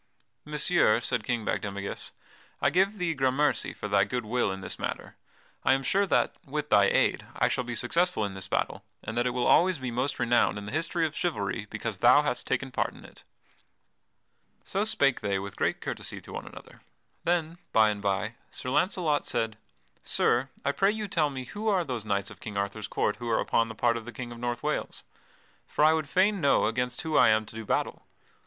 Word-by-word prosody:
"Messire," 150 Hz, -6 st, +3 dB
said 120 Hz, -2 st, -1 dB
King 120 Hz, -2 st, -2 dB
Bagdemagus, 100 Hz, -1 st, -3 dB, 0.5 s
"I -, -, +2 dB
give 195 Hz, +4 st, +2 dB
thee 175 Hz, -3 st, 0 dB
grammercy 135 Hz, +1 st, +1 dB
for -, -, -6 dB
thy 100 Hz, -1 st, +4 dB
good 120 Hz, +3 st, -2 dB
will 120 Hz, -1 st, 0 dB
in 95 Hz, 0 st, -5 dB
this -, -, -5 dB
matter. -, -, -4 dB, 0.5 s
I 130 Hz, -, +5 dB
am 135 Hz, 0 st, 0 dB
sure 200 Hz, +7 st, +2 dB
that, -, -, +2 dB
with 150 Hz, -1 st, -4 dB
thy 100 Hz, -1 st, +6 dB
aid, -, -, +2 dB
I -, -, +2 dB
shall 125 Hz, -, 0 dB
be 120 Hz, -1 st, -5 dB
successful 170 Hz, +1 st, +1 dB
in 100 Hz, -, -4 dB
this 95 Hz, 0 st, -6 dB
battle, -, -, -1 dB, 0.2 s
and 110 Hz, -, -5 dB
that 120 Hz, +1 st, +1 dB
it -, -, +2 dB
will 125 Hz, 0 st, -1 dB
always 180 Hz, +1 st, +5 dB
be 130 Hz, -2 st, -4 dB
most 125 Hz, +4 st, -1 dB
renowned 120 Hz, -2 st, +2 dB
in 100 Hz, -, -6 dB
the 105 Hz, -, -6 dB
history 165 Hz, +2 st, 0 dB
of 155 Hz, -1 st, -4 dB
chivalry 105 Hz, -, -2 dB
because 110 Hz, -5 st, -4 dB
thou 125 Hz, +6 st, +6 dB
hast 145 Hz, -4 st, -2 dB
taken 130 Hz, +1 st, -1 dB
part -, -, -1 dB
in -, -, -13 dB
it." -, -, -16 dB, 1.4 s
So 200 Hz, +2 st, -1 dB
spake 140 Hz, -, +3 dB
they 100 Hz, -1 st, 0 dB
with 100 Hz, +1 st, -6 dB
great -, -, 0 dB
courtesy -, -, -3 dB
to -, -, -11 dB
one -, -, -6 dB
another. -, -, -13 dB, 0.4 s
Then, 170 Hz, -1 st, 0 dB
by 110 Hz, -1 st, +5 dB
and 105 Hz, -1 st, -5 dB
by, 100 Hz, +2 st, -1 dB, 0.2 s
Sir 125 Hz, -, -5 dB
Launcelot 170 Hz, -1 st, +1 dB
said: 115 Hz, -2 st, -1 dB, 0.5 s
"Sir, 125 Hz, +3 st, +1 dB, 0.2 s
I 140 Hz, -, +3 dB
pray 195 Hz, +7 st, +2 dB
you 215 Hz, 0 st, -2 dB
tell 155 Hz, -5 st, +1 dB
me 130 Hz, -2 st, -5 dB
who 205 Hz, -, -5 dB
are 195 Hz, -4 st, +3 dB
those 125 Hz, -8 st, -4 dB
knights 100 Hz, -2 st, -1 dB
of -, -, -13 dB
King 105 Hz, -3 st, -6 dB
Arthur's 100 Hz, +1 st, -2 dB
court 105 Hz, -, 0 dB
who 120 Hz, -1 st, -5 dB
are 110 Hz, -, +2 dB
upon 115 Hz, 0 st, +1 dB
the 110 Hz, -, -7 dB
part 115 Hz, +1 st, +2 dB
of 115 Hz, -, -7 dB
the 120 Hz, -, -7 dB
King 120 Hz, 0 st, -7 dB
of 120 Hz, -, -9 dB
North 120 Hz, 0 st, -3 dB
Wales? -, -, -2 dB, 0.6 s
For -, -, 0 dB
I 155 Hz, +1 st, +7 dB
would 155 Hz, -3 st, -1 dB
fain 195 Hz, +1 st, +2 dB
know 140 Hz, -, +4 dB
against 125 Hz, +2 st, -1 dB
whom 160 Hz, -1 st, 0 dB
I 120 Hz, -, +7 dB
am 110 Hz, 0 st, +3 dB
to 110 Hz, -, -13 dB
do 110 Hz, 0 st, -6 dB
battle." -, -, -1 dB
125 Hz, 215 wpm, -28 LUFS, 110-155 Hz, 1.4 s, I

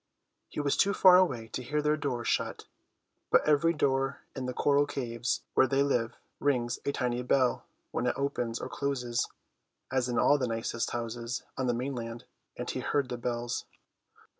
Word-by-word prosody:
He -, -, -5 dB
was 145 Hz, -1 st, +1 dB
too 200 Hz, 0 st, +3 dB
far 185 Hz, -1 st, +8 dB
away 130 Hz, -12 st, +2 dB
to 130 Hz, -, -4 dB
hear 145 Hz, +5 st, -1 dB
their 150 Hz, 0 st, +2 dB
doors 130 Hz, -5 st, -2 dB
shut; -, -, -1 dB, 0.6 s
but -, -, +4 dB
every 155 Hz, +2 st, +4 dB
door 135 Hz, -3 st, 0 dB
in 130 Hz, -2 st, -3 dB
the -, -, -1 dB
coral 145 Hz, 0 st, +3 dB
caves 120 Hz, -3 st, -2 dB
where 130 Hz, -, +5 dB
they 135 Hz, +1 st, +2 dB
live 120 Hz, -5 st, 0 dB, 0.2 s
rings 125 Hz, -4 st, +1 dB
a 140 Hz, -, +1 dB
tiny 125 Hz, -2 st, -1 dB
bell 125 Hz, 0 st, +2 dB, 0.3 s
when -, -, -1 dB
it -, -, +1 dB
opens 125 Hz, -4 st, -1 dB
or -, -, -4 dB
closes 125 Hz, -4 st, -1 dB, 0.6 s
(as 130 Hz, -1 st, +1 dB
in 120 Hz, -, -1 dB
all 145 Hz, -, +5 dB
the 125 Hz, -, 0 dB
nicest 115 Hz, 0 st, -2 dB
houses 120 Hz, 0 st, -4 dB
on 130 Hz, -2 st, -1 dB
the 120 Hz, -, +2 dB
mainland), 120 Hz, -2 st, -4 dB, 0.3 s
and -, -, -4 dB
he -, -, -3 dB
heard 140 Hz, -3 st, 0 dB
the 125 Hz, -, -2 dB
bells. 120 Hz, 0 st, -2 dB
130 Hz, 180 wpm, -30 LUFS, 120-140 Hz, 0.6 s, far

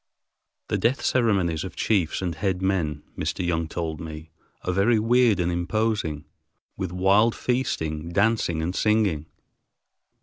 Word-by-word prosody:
The -, -, 0 dB
death 120 Hz, +4 st, +1 dB
ceremonies 95 Hz, -10 st, +2 dB
of 95 Hz, -, -7 dB
chiefs 95 Hz, -4 st, 0 dB
and 90 Hz, -2 st, -1 dB
head 90 Hz, +2 st, -1 dB
men, 85 Hz, -6 st, -1 dB
Mr. 90 Hz, -, -2 dB
Young 80 Hz, -2 st, 0 dB
told 80 Hz, -2 st, -4 dB
me, 80 Hz, 0 st, -8 dB, 0.3 s
are 90 Hz, -, -1 dB
very 105 Hz, +5 st, +3 dB
weird 115 Hz, -2 st, +3 dB
and 90 Hz, 0 st, +1 dB
imposing, 85 Hz, -4 st, -1 dB, 0.5 s
with 95 Hz, -3 st, -4 dB
wild 100 Hz, +5 st, +3 dB
feasting, 80 Hz, -11 st, -2 dB
dancing, 100 Hz, -4 st, +1 dB
and 90 Hz, +3 st, -2 dB
singing. 105 Hz, -8 st, +1 dB
90 Hz, 135 wpm, -25 LUFS, 80-110 Hz, 0.5 s, very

